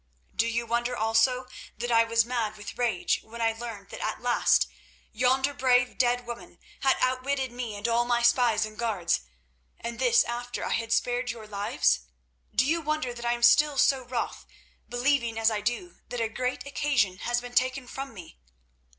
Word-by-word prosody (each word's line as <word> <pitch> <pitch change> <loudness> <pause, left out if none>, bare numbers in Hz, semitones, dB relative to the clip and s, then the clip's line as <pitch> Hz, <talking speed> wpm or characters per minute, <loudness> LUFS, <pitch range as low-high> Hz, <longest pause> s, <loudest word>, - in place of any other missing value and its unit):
"Do 230 - +2
you 235 +1 -1
wonder 240 +1 -1
also 225 +4 +2 0.3
that 240 0 -3
I 230 0 +6
was 230 0 +3
mad 230 -3 -2
with 205 - -8
rage 230 -7 0
when 230 +2 -11
I 225 -1 +2
learned 225 -4 -8
that - - -8
at - - -2
last - - +3 0.5
yonder 260 +4 +2
brave 250 -2 +2
dead 245 -1 +2
woman 235 0 -8 0.2
had 270 -1 +3
outwitted 260 +1 0
me 240 -3 -5
and 205 +3 -3
all 235 +1 +3
my 240 0 +1
spies 235 -2 +4
and 215 0 -11
guards, 205 - 0 0.6
and 235 0 -6
this 475 -2 +5
after 240 +1 -4
I - - -3
had 230 0 -2
spared 245 +1 +1
your 230 -3 -5
lives? 205 - +1 0.5
Do 250 - +2
you 330 +4 +1
wonder 305 -5 -2
that 240 0 -8
I 240 - +2
am 240 0 -5
still 290 +4 +6
so 270 0 +4
wroth, 245 -1 -4 0.4
believing 245 -2 +1
as 225 0 +3
I 210 -1 -2
do 240 - -3
that 245 - -4
a 225 -1 0
great 250 +3 -3
occasion 275 -10 0
has 240 0 0
been 245 0 -9
taken 255 +1 +1
from 270 +1 -6
me?" 175 - -12
240 Hz, 185 wpm, -27 LUFS, 225-255 Hz, 0.6 s, I